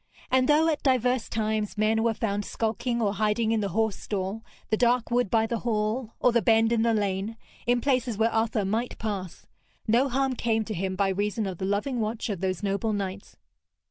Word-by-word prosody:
And 260 +1 +3
though 305 +2 +5
at 310 -2 0
divers 255 -2 +1
times 215 -1 -1
men 215 +1 +2
were 230 -1 +1
found 205 -2 -1
skulking 235 +3 -1
or 200 -1 +1
hiding 215 +2 +1
in 225 - +2
the 200 -2 -1
horse 220 +2 0
stall, 200 +2 -4 0.3
the - - +5
dark 240 +1 +2
wood 245 -3 +2
by 220 +1 +3
the 230 0 -2
hall, 225 +1 -1
or 250 - +4
the 235 0 +3
bend 225 +2 +4
in 230 -1 +2
the 230 0 +2
lane, 205 +1 -1 0.3
in 245 0 +3
places 255 -5 0
where 225 +1 +2
Arthur 225 -2 +1
might 225 +5 -2
pass, 195 -5 -5 0.4
no 240 +5 +3
harm 265 +1 +1
came 225 -3 0
to 215 - -4
him 190 0 -2
by 195 0 +1
reason 205 +3 -1
of 185 -3 -5
the 190 - -2
loving 210 +6 -1
watch 220 +2 -2
of 195 -4 -3
those 190 0 -2
noble 200 +2 0
knights. 200 -1 -5
220 Hz, 205 wpm, -27 LUFS, 205-235 Hz, 0.4 s, though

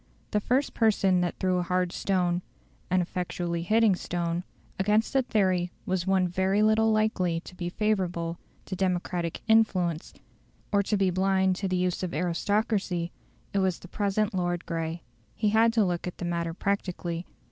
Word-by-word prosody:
The 210 - +2
first 255 +6 0
person 195 -5 +3
who 175 - +1
threw 185 -1 +1
a - - +1
hard 180 0 0
stone 180 -2 0 0.5
an 185 0 +3
effectually 175 -1 -3
hitting 215 +2 +4
stone 175 -1 -2 0.4
against 210 +3 +2
the 270 - +4
theory 185 -7 +1
was 185 -1 -1
one 190 -1 +3
very 190 +3 +1
little 220 +1 +4
likely 210 -6 +1
to 180 - -12
be 175 -1 -4
favourable 175 -5 -1 0.3
to 190 - -4
democratic 180 -2 -1
influence, 185 -7 +2 0.6
or 200 -1 +4
to 205 +1 0
be 195 -2 +2
blind 190 0 +2
to 195 - -2
the 185 - 0
use 180 0 0
of 180 -4 -3
aristocracy; 180 +1 0 0.4
it 200 - +2
was 190 -2 +1
the - - -12
present 205 +2 0
Lord 175 -1 -1
Grey. 165 0 -3 0.3
He 210 - +1
had 225 +2 +4
to 220 -3 +3
look 175 -1 -2
at 180 - -6
the - - -4
matter 170 -1 -2
practically. 180 -3 -2
185 Hz, 170 wpm, -27 LUFS, 175-205 Hz, 0.6 s, hitting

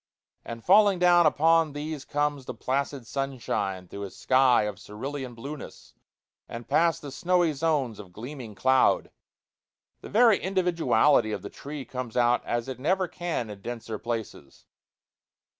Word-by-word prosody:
And 115 -1 -8
falling 205 -3 +6
down 175 -2 +5
upon 160 0 +3
these 150 -1 -5
comes 145 -2 -1
the 125 - -6
placid 135 +2 -2
sunshine 115 -9 -3
through 100 - -8
a - - -7
sky 130 +2 +3
of 105 -2 -4
cerulean 130 +4 -6
blueness, 140 +6 -9 0.6
and 115 0 -8
past 165 -1 +2
the 145 - -7
snowy 175 0 +1
zones 140 -7 -1
of 95 -4 -11
gleaming 115 +2 -8
cloud. 130 +4 +3 0.9
The - - -10
very 225 -1 +5
individuality 160 - +2
of - - -4
the - - -7
tree 145 -1 -8
comes 125 -2 -6
out 120 0 +3
as 120 0 -2
it 130 -2 -6
never 185 +6 +1
can 170 - -4
in 100 -1 -10
denser 115 -1 -6
places. 110 - -6
135 Hz, 145 wpm, -27 LUFS, 115-160 Hz, 0.9 s, falling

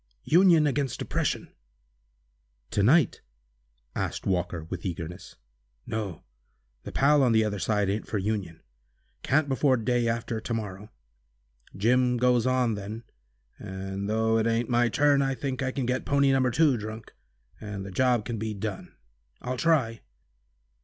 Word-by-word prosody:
Union 170 -2 +5
against 140 -3 -1
oppression!" - - -2 1.2
"To 100 - +1
night?" 135 +6 +4 0.7
asked - - -3
Walker, 90 -3 -1
with 85 +2 -7
eagerness. 90 0 -6 0.5
"No, 105 -7 -4 0.6
the - - -8
pal 145 +1 +4
on 125 -3 +3
the 110 0 +4
other 105 -2 -2
side 105 0 +1
ain't 100 +3 -2
for 110 - -2
Union. 95 -5 -3 0.6
Can't 145 +2 +2
before 135 -1 +2
day 120 +1 0
after 115 -1 -2
to 115 - -4
morrow. 105 -1 -6 0.9
Jim 125 +4 +2
goes 125 0 +3
on 130 -3 +2
then, 105 +3 -6 0.6
and 95 0 -5
though 110 +1 +2
it 110 - +1
ain't 115 +1 0
my 120 0 +3
turn, 145 +3 +3
I 135 -1 0
think 130 +1 -4
I 130 -1 -1
can 130 -1 -2
get 125 +1 -1
pony 140 -1 +3
No. 130 -1 +3
2 140 +1 +3
drunk, 110 +1 -8 0.5
and 105 -2 -6
the 100 - -7
job 120 +2 +2
can 115 -3 -4
be 110 0 -3
done. 100 -1 -6 0.5
I'll 125 +1 -2
try." 130 -8 +1
115 Hz, 150 wpm, -27 LUFS, 105-130 Hz, 1.2 s, Union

